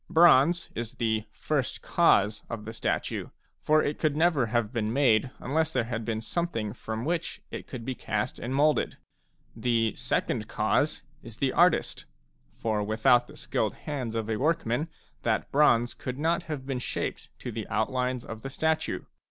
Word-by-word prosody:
Bronze 170 -1 +5
is 115 +1 -5
the 110 -2 0
"first 135 +4 -2
cause" 105 -11 +3
of 110 -2 -5
the 110 - -6
statue, 110 - -2 0.3
for 155 0 +3
it 145 - -2
could 155 -2 +1
never 160 -7 +3
have 115 0 0
been 110 -2 0
made 130 -2 +3
unless 160 +4 0
there 125 - +1
had 115 -1 -3
been 110 -1 -2
something 115 -7 -2
from 110 0 -5
which 170 +1 -2
it - - -6
could 125 -5 -7
be 130 - -2
cast 110 0 -2
and 125 +3 -3
moulded. 150 +2 +2 0.6
The 115 -3 +1
"second 105 - -1
cause 110 +7 +1
" 150 - -34
is 115 -2 -11
the 135 -2 +1
artist; 175 +2 +3 0.4
for 110 -2 -1
without 110 +3 +3
the - - -13
skilled - - -1
hands 130 -6 -4
of 110 -1 -1
a 110 -1 -1
workman 150 -1 +1 0.3
that - - 0
bronze 120 -5 +4
could 125 0 -5
not 165 +3 +1
have 140 -4 -4
been 135 -2 -2
shaped - - -4
to 125 - -6
the 110 -1 -5
outlines 125 +2 -1
of 110 0 -7
the 135 - -5
statue. 160 +3 0
125 Hz, 175 wpm, -28 LUFS, 110-150 Hz, 0.6 s, Bronze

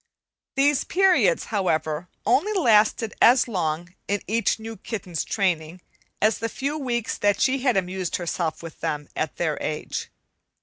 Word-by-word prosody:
These 280 +1 +3
periods, 385 +6 +3
however, 160 -4 0 0.2
only 285 - +2
lasted 225 - +3
as 250 +2 +6
long, 175 -4 -2
in 205 0 -1
each 225 +2 +1
new 225 0 -7
kitten's 185 -8 -4
training, 175 -4 -1 0.4
as 215 +1 +2
the 230 0 -2
few 280 +5 -3
weeks 240 -6 -2
that 205 -1 +2
she 270 +1 +2
had 250 -5 +2
amused 185 -1 -2
herself 170 -2 -2
with 165 -1 -9
them 150 -1 -3
at 155 - -2
their 160 -3 -1
age. 150 0 -4
205 Hz, 145 wpm, -24 LUFS, 170-250 Hz, 0.4 s, as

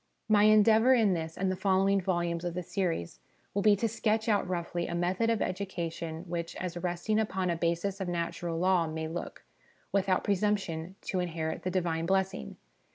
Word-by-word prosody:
My 210 -1 +5
endeavour 220 +4 +6
in 215 -5 +3
this 160 -1 -4
and 190 0 0
the - - -1
following 195 +1 +2
volumes 175 -2 -1
of 175 -1 -3
the 180 - -3
series 170 - -2 0.3
will 200 - 0
be 210 0 +5
to 230 +3 0
sketch 220 0 0
out 205 -4 +2
roughly 175 -1 -2
a 170 - -3
method 180 +6 +1
of 230 -3 +1
education 170 -4 -4
which, 170 -1 -4
as 180 -2 -4
resting 175 +5 -1
upon 190 -4 0
a - - 0
basis 170 +4 -1
of 190 - -2
natural 170 -1 -2
law, 180 -1 +3
may 160 0 -4
look, 170 +2 -6 0.5
without 190 -1 +1
presumption, 195 -4 -1
to 185 - -2
inherit 165 -3 -3
the 185 - -2
Divine 170 -3 -1
blessing. 190 - -1
185 Hz, 180 wpm, -30 LUFS, 170-200 Hz, 0.5 s, endeavour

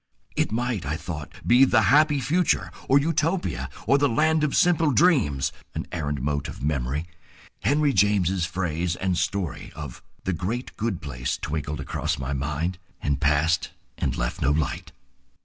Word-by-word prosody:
It - - +1
might, 120 -3 -1
I 75 +3 -2
thought, 80 -3 -6
be 125 +3 +6
the 115 -4 +4
Happy 145 - +5
Future, 165 +6 +1 0.2
or 135 - +6
Utopia, 165 +4 0 0.2
or 140 - +4
the 145 0 +3
Land 155 +6 +2
of 150 - +1
Simple 165 -3 +4
Dreams; 130 - +3 0.2
an - - -3
errant 75 -5 -2
mote 70 0 -1
of - - -8
memory, 70 +1 -1 0.5
Henry 145 - +2
James's 95 -3 +2
phrase 85 -1 -1
and 95 0 -1
story 85 -3 -2
of 75 -6 -7 0.2
"The 95 - -1
Great 110 +9 -3
Good 110 -5 -2
Place," 65 -3 -3
twinkled 75 -1 -3
across 75 +2 -2
my 65 +1 -3
mind, 75 +6 -2 0.2
and 70 -1 -1
passed 75 +3 +2 0.3
and - - -1
left - - -2
no 70 - +3
light. 75 0 -1
90 Hz, 160 wpm, -25 LUFS, -, 0.5 s, be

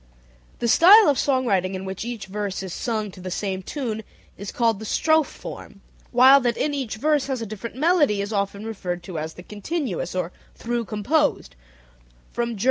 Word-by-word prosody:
The 235 - -1
style 390 - +8
of 280 - +2
song 260 -2 +1
writing 190 -4 +1
in 190 +1 -5
which 190 +1 -5
each 235 -4 -5
verse 200 0 -4
is 185 -3 -6
sung 215 -4 -2
to 185 - -14
the 185 - -5
same 190 0 -3
tune 225 0 -4 0.3
is 200 0 -7
called 230 -4 +1
the - - -8
"strophe 315 +7 +2
form," - - -10 0.3
while 260 +3 +7
that 240 -2 0
in 300 - 0
which 285 - -3
each 245 -6 -4
verse 295 +4 +1
has 265 -2 -2
a 225 - -4
different 215 +2 -7
melody 295 - +3
is 200 +2 -3
often 200 +1 -2
referred 180 -5 -4
to 175 -3 -5
as 160 +1 -5
the 180 - -11
"continuous" 210 - -4
or 180 -1 -2 0.2
"through 235 0 -3
composed" 215 - 0 0.8
form 235 -2 -2
(Ger. - - -12
220 Hz, 200 wpm, -23 LUFS, 195-265 Hz, 0.8 s, style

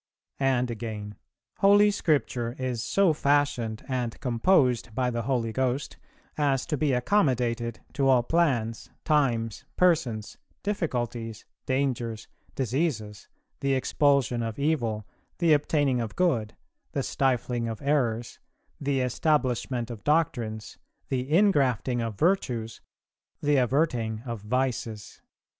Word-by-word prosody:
"[341:1] 135 - +2
And 125 -2 +1
again: 105 -2 -6 0.4
"Holy 205 +1 +6
Scripture 135 -10 0
is 125 -3 -2
so 195 -5 +3
fashioned 140 -7 0
and 125 -4 -2
composed 125 - +2
by 125 -1 +1
the 120 0 -2
Holy 115 -2 -1
Ghost 130 +2 -1 0.4
as 140 -3 +1
to - - -1
be 145 0 +1
accommodated 125 - +1
to 135 -2 +1
all 125 -2 +5
plans, 120 -8 0 0.2
times, 120 -8 +1
persons, 130 -12 +1 0.2
difficulties, 120 - -3 0.2
dangers, 125 -4 -1 0.3
diseases, 120 - -2 0.3
the 140 0 +1
expulsion 130 -3 +2
of 115 -1 -4
evil, 120 -8 0 0.3
the 170 -3 +4
obtaining 145 -3 +2
of 110 -1 -5
good, 125 -13 +1 0.4
the - - -1
stifling 125 -3 0
of 115 -2 -4
errors, 120 -5 0 0.4
the 140 -2 0
establishment 125 -2 0
of 110 -4 -9
doctrines, 130 -9 -1 0.3
the 130 -1 -1
ingrafting 135 - +3
of 115 -3 -4
virtues, 125 - 0 0.6
the 145 -1 +2
averting 125 -4 +1
of 115 -4 -5
vices. 115 -2 -3
125 Hz, 115 wpm, -27 LUFS, 115-145 Hz, 0.6 s, Holy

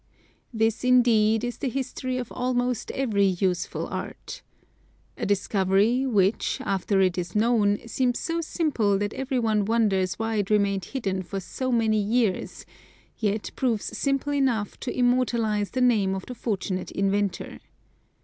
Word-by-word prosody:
This, 225 0 0
indeed, 230 -3 +4
is 245 0 -4
the 270 - -1
history 255 0 -3
of 250 -2 -5
almost 245 -1 -1
every 210 -7 +1
useful 180 -3 -1
art. - - -7 0.7
A - - -3
discovery, 200 +5 +2
which, 205 -3 +1
after 195 0 0
it 185 -1 +2
is 175 +2 -5
known, 210 -2 +3
seems 245 +1 0
so 335 0 -2
simple 280 - 0
that 205 +1 -2
every 265 0 -2
one 220 -3 +1
wonders 195 -5 +1
why 225 0 -1
it 205 -2 -1
remained 200 -3 +1
hidden 195 -8 -2
for 190 +2 -5
so 255 +7 -4
many 220 -3 +2
years, 215 -2 -1 0.5
yet 210 -1 -1
proves 225 -4 -1
simple 275 +4 0
enough 250 -7 0
to 255 - -5
immortalize 235 -4 +1
the 255 - -2
name 210 -6 +3
of 190 - -6
the 250 - -7
fortunate 195 -5 -3
inventor. 195 0 -1
220 Hz, 145 wpm, -25 LUFS, 200-250 Hz, 0.7 s, indeed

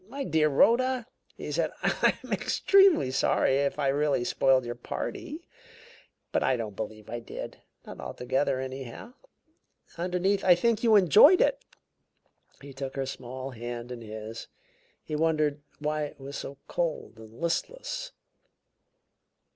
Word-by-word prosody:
"My 275 +5 -5
dear 155 - +2
Rhoda," 245 - +3 0.3
he - - -6
said, - - 0
"I'm - - +1
extremely 390 - +4
sorry 135 0 +2
if 140 +1 0
I 140 -2 +1
really 145 -2 +1
spoiled 130 +1 +2
your 120 - -3
party, 295 - -6 0.8
but - - +1
I 130 - +2
don't 110 -4 -5
believe 110 0 -6
I 120 +1 -4
did 115 - -8 0.2
not - - -10
altogether, 130 +2 -1
anyhow. 130 - -7 0.9
Underneath, 180 +3 0
I 180 -1 +7
think 230 +5 +1
you 225 -2 +5
enjoyed 210 - +7
it." - - +2 1.0
He 140 -1 -10
took 135 0 -6
her 135 -1 -1
small 130 +1 -6
hand 120 0 -6
in 120 -1 -7
his; 110 +1 -8 0.6
he 155 - -4
wondered 155 -2 +1 0.2
why 150 0 -1
it 145 - -11
was 140 +1 -8
so 140 0 -6
cold 165 -9 -3
and 110 +1 -13
listless. - - -3
140 Hz, 140 wpm, -28 LUFS, 125-185 Hz, 1.0 s, I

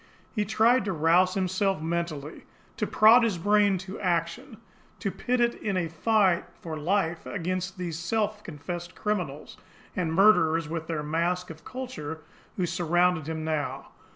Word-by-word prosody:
He 210 -3 0
tried 225 +4 +3
to 195 - -1
rouse 175 +3 +3
himself 190 0 0
mentally, 160 -2 -4 0.3
to - - -1
prod 225 +3 +6
his 225 -6 +1
brain 205 +2 +3
to 190 +2 -7
action, 185 - -2 0.4
to 200 - -2
pit 250 +5 -1
it 240 0 +3
in 200 -3 -3
a 170 -2 -1
fight 190 +1 +2 0.2
for 160 -2 -6
life 170 +1 -1
against 185 0 -3
these 170 -3 -4
self 210 +4 -1
confessed 175 +1 -7
criminals 180 -9 -3 0.4
and 170 -3 -1
murderers 165 -4 +4
with 160 0 -4
their 160 -3 -2
mask 170 +3 -1
of 160 0 -12
culture, 200 - -6 0.4
who 185 - +1
surrounded 175 -1 +1
him 160 -1 -3
now. 155 -2 -3
180 Hz, 155 wpm, -27 LUFS, 165-205 Hz, 0.4 s, prod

